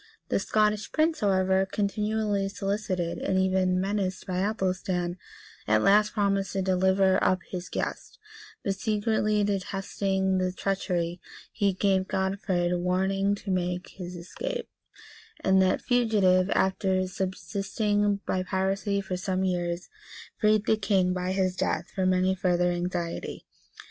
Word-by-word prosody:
The - - +2
Scottish 215 -1 +1
prince, 315 0 +1
however, 190 -1 +2
continually 210 0 -1
solicited, 195 -3 -2
and 190 - 0
even 185 -1 +2
menaced 195 -1 -2
by 180 -1 -2
Athelstan, 185 -3 -1 0.5
at - - +3
last 210 +2 +4
promised 200 -2 0
to 195 - 0
deliver 190 +1 +3
up 185 -1 +2
his 180 -1 -6
guest; - - -4 0.5
but 195 - 0
secretly 210 0 +1
detesting 195 -1 -1
this 185 0 -1
treachery, 180 -3 -1 0.3
he 200 -3 +1
gave 190 0 +1
Godfrid 190 -2 0
warning 190 +3 +1
to 200 -1 -5
make 180 -1 -1
his 180 -1 -8
escape;[*] 480 - -5 0.7
and 190 0 +4
that 185 0 +2
fugitive, 205 -7 +3
after 190 -1 +1
subsisting 200 +2 -1
by 185 - 0
piracy 195 +2 -1
for 190 -2 -4
some 185 0 -1
years, 175 -1 -1 0.5
freed 215 -1 +2
the 220 - +3
king, 195 -3 +2
by 180 0 -2
his 185 -1 0
death, - - -1
from 185 -1 +1
any 185 +1 +2
further 180 -1 +1
anxiety. 175 -1 -3
190 Hz, 130 wpm, -27 LUFS, 185-200 Hz, 0.7 s, last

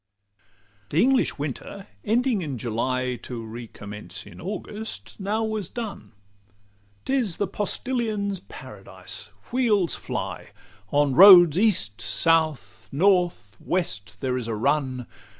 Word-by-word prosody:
XLII 100 0 -44 0.5
The - - +6
English 265 +1 +2
winter 155 +7 -6 0.2
ending 230 0 +1
in 145 -6 -4
July, 125 +2 -1
To 115 -3 -6
recommence 110 -2 -9
in - - -12
August 200 - -6
now 210 +3 -1
was 215 -5 -3
done. 225 - -7 0.9
'T 265 - -1
is 235 -11 +1
the 205 - +1
postilion's 205 0 -2
paradise: - - -9 0.2
wheels 220 -8 +2
fly; - - -5 0.4
On 145 -1 +2
roads, 175 -2 +9
east, 170 - +1
south, 155 - 0
north, 175 - +2
west, 105 - -3
there 130 -1 0
is 120 -3 -4
a 115 - -2
run. 130 +1 0
165 Hz, 120 wpm, -25 LUFS, -, 0.9 s, roads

